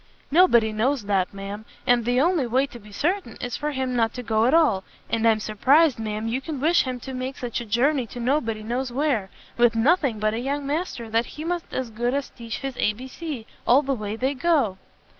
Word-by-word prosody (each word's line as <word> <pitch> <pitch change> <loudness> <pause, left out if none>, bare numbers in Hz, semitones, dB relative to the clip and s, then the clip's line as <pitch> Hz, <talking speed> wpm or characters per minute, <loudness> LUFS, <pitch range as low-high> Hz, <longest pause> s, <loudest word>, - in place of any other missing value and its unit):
"Nobody 240 -10 +5
knows 245 +3 +1
that, 195 -2 0
ma'am; 200 +2 -7 0.2
and 245 -2 +3
the 245 +1 +2
only 320 -3 +2
way 260 +4 +2
to 260 -4 -11
be 210 -1 -15
certain 325 - -1
is 245 -1 -4
for 295 - -2
him 260 -3 -2
not 225 -1 +1
to 250 - -5
go 220 -1 +2
at 255 - +3
all; 255 -13 +3 0.3
and 230 0 +2
I'm 220 -1 +4
surprised, 260 +7 +3
ma'am, 215 0 -3
you 245 +4 -1
can 290 0 -5
wish 325 +4 +3
him 255 -1 -3
to 265 - -7
make 255 +1 -4
such 240 -1 -3
a - - -6
journey 250 +4 +1
to 245 - -9
nobody 235 -4 0
knows 245 +3 -2
where, 250 -7 0 0.3
with 240 -1 +4
nothing 270 0 +2
but 215 0 +1
a 225 - -2
young 280 +3 -2
master 285 -5 -3
that 230 +2 +1
he 305 - -5
must 345 +1 -3
as 255 -3 -3
good 240 +4 -1
as 280 -1 -3
teach 230 -2 -7
his 270 -2 -4
A. 210 - +2
B. 250 +5 -9
C. 280 -4 -6 0.2
all 265 +5 +6
the 275 0 0
way 215 -3 -4
they 260 +4 0
go!" 270 - +1
245 Hz, 230 wpm, -24 LUFS, 225-280 Hz, 0.3 s, all